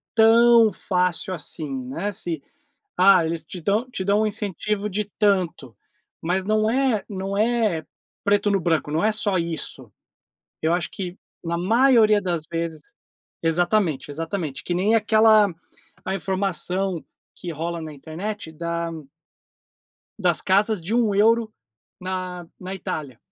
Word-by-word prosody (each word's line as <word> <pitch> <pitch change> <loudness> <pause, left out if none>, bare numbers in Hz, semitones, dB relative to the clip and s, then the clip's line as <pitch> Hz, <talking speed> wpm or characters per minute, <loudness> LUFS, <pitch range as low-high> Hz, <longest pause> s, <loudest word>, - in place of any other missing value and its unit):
tão 230 0 +6
fácil 180 0 -1
assim, 155 -2 -4 0.2
né, 170 +10 -3
se: 170 -7 -3 0.6
"Ah, 185 -2 +6
eles 160 -1 -3
te 180 +2 -8
dão 210 +9 0
te 190 -6 -4
dão 200 +2 +2
um 215 - +2
incentivo 210 0 -2
de 210 +2 -2
tanto", 185 - +1 0.5
mas 180 +3 0
não 215 +1 +2
é 250 -4 +1
não 195 0 -4
é 215 -7 +1 0.4
"preto 205 0 +3
no 195 - +2
branco", 160 -3 0
não 160 +4 0
é 220 - +4
só 205 -3 0
isso. 165 -3 -4 0.7
Eu 160 +2 +2
acho 175 0 -1
que, 180 -3 -6 0.3
na 170 0 -2
maioria 220 +2 +4
das 175 -4 -2
vezes 165 -2 -3 0.6
Exatamente, 165 -3 +1
exatamente. 160 -1 -4
Que 175 - -2
nem 205 +5 +2
aquela 215 -2 +5 0.5
a 190 - -1
informação 190 0 -1 0.3
que 175 -2 -6
rola 165 +2 -4
na 155 -1 -7
internet 160 +5 -6
da 170 +1 -3 1.3
das - - +2
casas 205 +2 +2
de 185 +7 -3
1€ 225 0 +3 0.5
na 185 -1 -4
na 185 +1 -6
Itália. 145 -9 -5
190 Hz, 135 wpm, -23 LUFS, 170-215 Hz, 1.3 s, tão